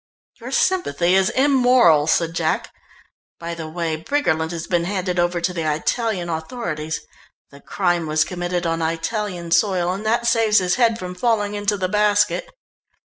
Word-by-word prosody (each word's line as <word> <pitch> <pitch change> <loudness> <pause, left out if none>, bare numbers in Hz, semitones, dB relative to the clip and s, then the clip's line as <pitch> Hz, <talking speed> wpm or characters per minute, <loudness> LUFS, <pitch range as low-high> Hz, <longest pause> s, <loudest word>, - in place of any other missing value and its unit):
"Your 240 +2 -8
sympathy 270 - +1
is 190 0 +3
immoral," 250 - +4
said 165 +1 +1
Jack. 160 -1 -1 0.7
"By 170 0 -5
the 160 -2 -7
way, 165 -1 -2
Briggerland 160 - -1
has 170 -1 -5
been 175 -1 0
handed 185 -1 -2
over 175 0 +1
to 175 +2 -1
the 160 -3 -1
Italian 185 +4 -1
authorities. 160 -2 -4 0.5
The 140 0 -15
crime 175 -4 -1
was 155 0 +2
committed 175 0 -3
on 165 0 -1
Italian 170 +2 -3
soil 180 -2 +2
and 195 +3 -6
that 235 +2 0
saves 225 -3 +3
his 180 -1 +2
head 230 -2 +2
from 180 -4 -6
falling 205 +1 0
into 205 0 -1
the 185 -1 -1
basket." 210 - +1
180 Hz, 160 wpm, -21 LUFS, 165-215 Hz, 0.7 s, immoral